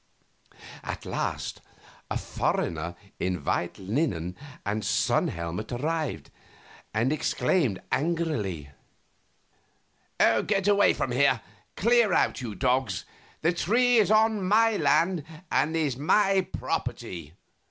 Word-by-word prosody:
At - - -6
last - - -3 0.5
a - - -1
foreigner 85 +1 -2 0.2
in 90 -4 -2
white 85 - -1
linen 95 - -2 0.3
and 105 +1 -1
sun - - +2
helmet 85 +7 -4
arrived, 145 - -2 0.6
and 115 +6 +1
exclaimed, 150 - +1
angrily: 135 - -1 1.5
"Away 200 - +4
from - - -2
here! - - +3 0.4
Clear 235 -4 +3
out, - - +2
you 115 -5 -5
dogs; 125 -7 0 0.4
the 165 +3 +3
tree 240 +7 +3
is 210 -3 +4
on 215 -1 +3
my 220 +4 +4
lands 175 -3 +2 0.3
and 155 +3 +2
is 150 -5 0
my 195 +6 +3
property." 85 -3 -4
145 Hz, 105 wpm, -27 LUFS, -, 1.5 s, Away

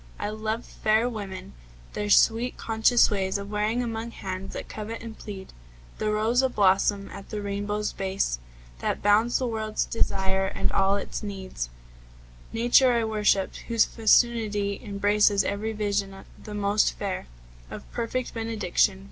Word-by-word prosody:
I 205 - -3
loved 220 +2 -3
fair 220 +2 +1
women, 200 - -6 0.4
their 210 0 -3
sweet, 230 +4 +4
conscious 225 +1 +3
ways 195 -1 0
Of 200 0 -7
wearing 215 +4 0
among 230 0 -4
hands 190 -3 -6
that - - -6
covet 220 +2 -6
and 225 -1 -7
plead 195 -2 -9 0.5
The 215 - 0
rose 220 +4 +2
ablossom 200 -4 +2
at 195 - -10
the 210 - -4
rainbow's 205 +1 -2
base 190 - -1 0.4
That - - -2
bounds 215 +4 +4
the 260 - -1
world's 220 -2 -1
desire 190 -3 0
and 195 0 -1
all 195 0 +3
its 200 - -4
need. 195 -3 -7 1.0
Nature 245 +2 +4
I 235 -1 +2
worshipped, 210 -3 +1
whose 230 -2 +4
fecundity 215 -3 +2
Embraces 205 -1 +3
every 210 +2 -2
vision 200 -2 -2 0.2
the 210 - -7
most 205 +1 +2
fair, 195 - -4 0.4
Of - - -8
perfect 240 +2 -3
benediction. 215 -4 +1
210 Hz, 145 wpm, -26 LUFS, 200-225 Hz, 1.0 s, sweet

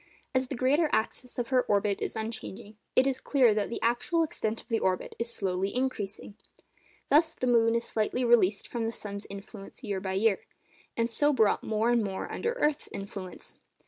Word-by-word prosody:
As 260 0 +1
the 270 - -4
greater 285 +6 +2
axis 245 +3 -2
of 240 -2 -2
her 255 -1 +4
orbit 205 -2 +1
is - - -3
unchanging, 220 -1 -6 0.2
it 255 - +5
is 265 -1 0
clear 255 -6 +4
that 210 -1 -1
the - - -4
actual 245 +8 +2
extent 225 -7 -2
of - - -15
the 230 -2 0
orbit 185 -1 -1
is 235 0 +1
slowly 190 -1 -1
increasing. 210 -6 -3 0.8
Thus, 320 +2 +4
the - - -2
moon 230 -2 +4
is 235 - +1
slightly 230 +3 0
released 220 -4 +4
from 235 -2 -3
the 225 - -1
sun's 200 -2 -5
influence 200 +4 -10
year 200 -4 -2
by 190 0 -3
year, 200 +1 +2 0.6
and 230 0 +2
so 290 +6 +2
brought 220 -5 +3
more 220 +2 +1
and 235 -2 +3
more 195 -2 -4
under 470 +1 -2
the - - -8
earth's 300 -1 +1
influence. 195 -2 -7
230 Hz, 195 wpm, -29 LUFS, 205-255 Hz, 0.8 s, it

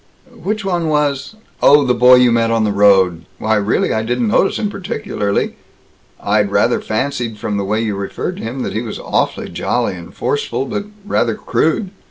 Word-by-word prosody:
"Which 215 +4 -4
one 175 -4 0
was 145 +1 0 0.3
Oh, 145 0 +6
the 125 - +2
boy 125 +1 +7
you 125 -1 +5
met 115 -1 +2
on 115 -1 +1
the 105 - +1
road? 95 -4 +3
Why, 110 +3 0
really, 105 +1 +1
I 110 - 0
didn't 120 0 -1
notice 195 - +2
him 210 - -1
particularly. 195 - -3 0.6
I'd - - +1
rather - - +2
fancied 115 -1 -2
from 105 0 -3
the 100 - -1
way 105 +3 0
you 110 -3 -2
referred 100 - -4
to - - -7
him 125 +3 -4
that - - -4
he 110 - -1
was 115 -3 -5
awfully - - -1
jolly - - -1
and 85 -2 -10
forceful, 130 0 -2
but 200 +8 -4 0.2
rather 120 - 0
crude. 180 +5 0
120 Hz, 190 wpm, -17 LUFS, 105-145 Hz, 0.6 s, boy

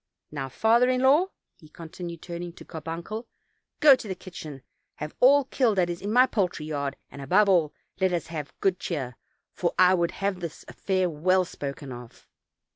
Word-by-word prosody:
Now, 135 -3 -4
father 230 - +3
in 255 0 +1
law," 290 +8 +5 0.3
he 155 -4 -17
continued, 170 +1 -8
turning 175 0 -6
to - - -13
Carbuncle, 170 - -6 0.5
"go 290 -3 +8
to 230 - -9
the 190 - -3
kitchen, 155 -8 -9 0.3
have 150 +1 -6
all 280 +3 +6
killed 240 -6 +1
that 175 -2 +2
is 170 - -6
in 205 - -3
my 250 +3 +6
poultry 180 -10 -1
yard, 140 -3 -3 0.2
and, 140 - -9
above 190 +10 +3
all, 170 -6 +3 0.3
let 190 -1 +2
us 175 -3 -1
have 150 -4 -6
good 190 -2 +1
cheer, 130 -8 -4 0.4
for 175 - -1
I 185 0 +6
would 170 -2 +2
have 195 -1 -2
this 170 -3 -7
affair 185 -2 0
well 180 +4 +2
spoken 140 -4 -7
of." 120 -1 -11
175 Hz, 185 wpm, -26 LUFS, 155-200 Hz, 0.5 s, go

